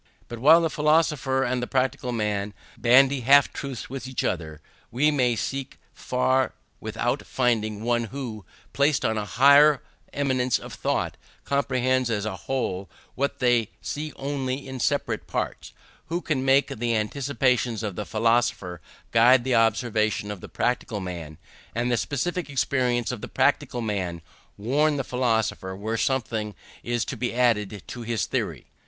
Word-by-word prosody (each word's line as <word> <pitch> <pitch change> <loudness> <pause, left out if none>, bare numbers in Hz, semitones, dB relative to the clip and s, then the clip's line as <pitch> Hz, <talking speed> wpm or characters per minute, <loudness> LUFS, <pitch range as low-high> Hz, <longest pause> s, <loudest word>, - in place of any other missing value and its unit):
But 120 - -7
while 155 +7 +7
the 165 - +1
philosopher 150 -3 +2
and 125 -1 -1
the 125 - -3
practical 130 -1 -1
man 105 -3 -2 0.2
bandy 135 +3 +5
half 140 +3 +5
truths 135 -4 -6
with 130 -1 -6
one 130 - -10
another, 80 -2 -2 0.3
we 145 +6 +2
may 125 -5 +2
seek 135 +4 -4 0.2
far 130 +1 0 0.2
without - - -2
finding 110 -4 0
one 120 0 +1
who, 115 -4 -6 0.3
placed 140 0 +2
on 110 -1 +1
a 105 - -3
higher 140 +5 +6 0.3
eminence 130 -3 +1
of - - -10
thought, - - -2 0.3
comprehends 130 -2 +1
as 105 -2 -1
a 105 -3 -3
whole 95 -5 -3 0.2
what 140 +2 -1
they 120 -4 +2
see 150 +1 -4
only 135 -1 -3
in 130 -1 -6
separate - - -1
parts; - - -4 0.4
who 170 +2 -1
can 155 -7 -1
make 135 +1 +4
the 115 0 -1
anticipations 125 0 0
of 105 -4 -3
the 105 - -3
philosopher 110 -6 0 0.3
guide 120 +2 +6
the 130 0 0
observation 110 -2 +1
of 100 -3 -7
the - - -9
practical 120 -3 -1
man, 85 -5 -6 0.4
and 120 +1 0
the - - +3
specific 150 +7 -2
experience 125 -3 0
of - - -6
the - - -5
practical 120 - +1
man 95 -6 -3 0.3
warn 145 +8 +1
the 135 - -1
philosopher 110 -6 -1
where 110 +4 -3
something 115 -5 -1 0.3
is 120 -1 -1
to - - -5
be 120 -1 -3
added 105 -5 +1
to 120 - -8
his 115 -2 -1
theory. - - -3
125 Hz, 155 wpm, -25 LUFS, 110-135 Hz, 0.4 s, while